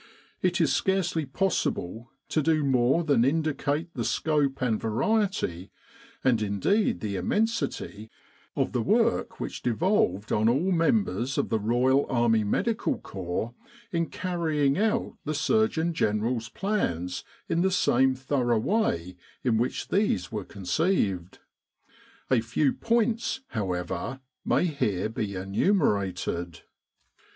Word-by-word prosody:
It -, -, +1 dB
is -, -, +3 dB
scarcely 180 Hz, -6 st, 0 dB
possible 120 Hz, -, -1 dB, 0.2 s
to 155 Hz, -, +1 dB
do 155 Hz, 0 st, +2 dB
more 135 Hz, +4 st, +3 dB
than 140 Hz, -7 st, +3 dB
indicate 155 Hz, +2 st, 0 dB
the -, -, -3 dB
scope 145 Hz, -4 st, 0 dB
and 120 Hz, -4 st, 0 dB
variety, 115 Hz, -, 0 dB, 0.5 s
and 120 Hz, -4 st, +3 dB
indeed 105 Hz, -, +1 dB
the 100 Hz, -3 st, -2 dB
immensity, 210 Hz, -, -1 dB, 0.5 s
of -, -, 0 dB
the -, -, 0 dB
work -, -, +1 dB
which -, -, -5 dB
devolved 120 Hz, -, +1 dB
on 110 Hz, +2 st, +3 dB
all 150 Hz, +11 st, +1 dB
members 165 Hz, -, +1 dB
of -, -, 0 dB
the 110 Hz, -, +1 dB
Royal 125 Hz, +6 st, +2 dB
Army 120 Hz, -3 st, +3 dB
Medical 215 Hz, -, 0 dB
Corps 95 Hz, +5 st, -4 dB, 0.4 s
in 170 Hz, -1 st, 0 dB
carrying 160 Hz, -6 st, 0 dB
out 220 Hz, +3 st, 0 dB
the 155 Hz, +1 st, -2 dB
Surgeon 170 Hz, 0 st, +1 dB
General's 110 Hz, -2 st, 0 dB
plans 90 Hz, -, -2 dB, 0.2 s
in 170 Hz, -, +1 dB
the 190 Hz, -, +3 dB
same 130 Hz, -7 st, +3 dB
thorough 130 Hz, -3 st, 0 dB
way 110 Hz, -, 0 dB, 0.3 s
in 115 Hz, -3 st, +2 dB
which 120 Hz, -, -2 dB
these 185 Hz, -, +1 dB
were 105 Hz, -3 st, -3 dB
conceived. 100 Hz, -, -1 dB, 0.9 s
A 125 Hz, -3 st, +4 dB
few 125 Hz, +5 st, +1 dB
points, 230 Hz, +2 st, 0 dB
however, 95 Hz, +3 st, -3 dB, 0.2 s
may -, -, +2 dB
here 110 Hz, -, -1 dB
be 105 Hz, -3 st, -3 dB
enumerated. 95 Hz, -, 0 dB
130 Hz, 125 wpm, -27 LUFS, 105-170 Hz, 0.9 s, A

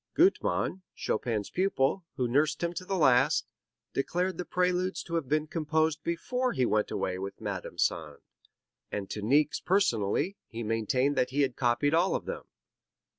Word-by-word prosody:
Gutmann, 340 Hz, -, +2 dB
Chopin's 110 Hz, -2 st, -2 dB
pupil, 185 Hz, -2 st, +1 dB
who 125 Hz, -, 0 dB
nursed 145 Hz, +7 st, +1 dB
him 170 Hz, 0 st, 0 dB
to 180 Hz, +2 st, -6 dB
the 195 Hz, +1 st, -1 dB
last, 145 Hz, -1 st, +4 dB, 0.5 s
declared 180 Hz, +5 st, -1 dB
the 180 Hz, -, -2 dB
Preludes 180 Hz, +1 st, 0 dB
to 170 Hz, -, -9 dB
have 165 Hz, -5 st, 0 dB
been 155 Hz, +1 st, +2 dB
composed 155 Hz, 0 st, 0 dB
before 250 Hz, +9 st, -1 dB
he 130 Hz, -, +2 dB
went 105 Hz, -2 st, +1 dB
away 90 Hz, 0 st, -2 dB
with 95 Hz, +1 st, -6 dB
Madame 100 Hz, -4 st, -5 dB
Sand, 75 Hz, -3 st, 0 dB, 0.7 s
and 100 Hz, -2 st, -4 dB
to 105 Hz, -, -4 dB
Niecks 145 Hz, +8 st, +3 dB
personally 180 Hz, -, +1 dB
he 115 Hz, 0 st, -6 dB
maintained 115 Hz, +6 st, +1 dB
that 125 Hz, -, +2 dB
he 140 Hz, +3 st, 0 dB
had 130 Hz, -3 st, -1 dB
copied 125 Hz, +4 st, +2 dB
all 175 Hz, +4 st, +3 dB
of -, -, -3 dB
them. -, -, -5 dB
145 Hz, 165 wpm, -29 LUFS, 115-175 Hz, 0.7 s, last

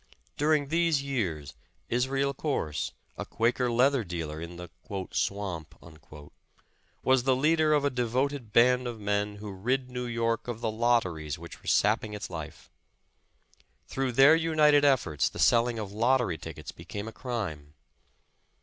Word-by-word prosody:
During 150 Hz, -1 st, +1 dB
these 165 Hz, -3 st, +2 dB
years 95 Hz, -, -3 dB, 0.3 s
Israel 135 Hz, +3 st, 0 dB
Corse, 130 Hz, -, -2 dB, 0.3 s
a -, -, -2 dB
Quaker 120 Hz, +2 st, 0 dB
leather 130 Hz, +1 st, +3 dB
dealer 80 Hz, -4 st, -5 dB
in 85 Hz, +1 st, -7 dB
the 90 Hz, 0 st, -9 dB, 0.4 s
''Swamp," 85 Hz, -6 st, -3 dB, 1.2 s
was 130 Hz, -1 st, +4 dB
the 130 Hz, +1 st, +2 dB
leader 155 Hz, +3 st, +3 dB
of 145 Hz, -1 st, +2 dB
a 145 Hz, -, +1 dB
devoted 125 Hz, 0 st, -1 dB
band 125 Hz, +2 st, +4 dB
of 120 Hz, -2 st, -6 dB
men 105 Hz, 0 st, -1 dB
who 105 Hz, 0 st, -8 dB
rid 125 Hz, +7 st, -2 dB
New 125 Hz, 0 st, -4 dB
York 115 Hz, 0 st, -1 dB
of 120 Hz, -2 st, -4 dB
the 110 Hz, -, -1 dB
lotteries 100 Hz, -10 st, 0 dB
which 85 Hz, 0 st, -11 dB
were -, -, -15 dB
sapping 105 Hz, 0 st, +2 dB
its 105 Hz, -, -7 dB
life. 80 Hz, -3 st, -8 dB, 1.2 s
Through 135 Hz, -2 st, -2 dB
their 135 Hz, +6 st, +7 dB
united 155 Hz, -3 st, +4 dB
efforts, 130 Hz, -, +2 dB
the -, -, -11 dB
selling 120 Hz, 0 st, +3 dB
of 105 Hz, -3 st, -5 dB
lot 120 Hz, +5 st, +3 dB
tery 90 Hz, -10 st, -2 dB
tickets 80 Hz, -2 st, -8 dB
became 100 Hz, +2 st, -7 dB
a -, -, -6 dB
crime. 85 Hz, -, -5 dB
120 Hz, 150 wpm, -28 LUFS, 95-135 Hz, 1.2 s, their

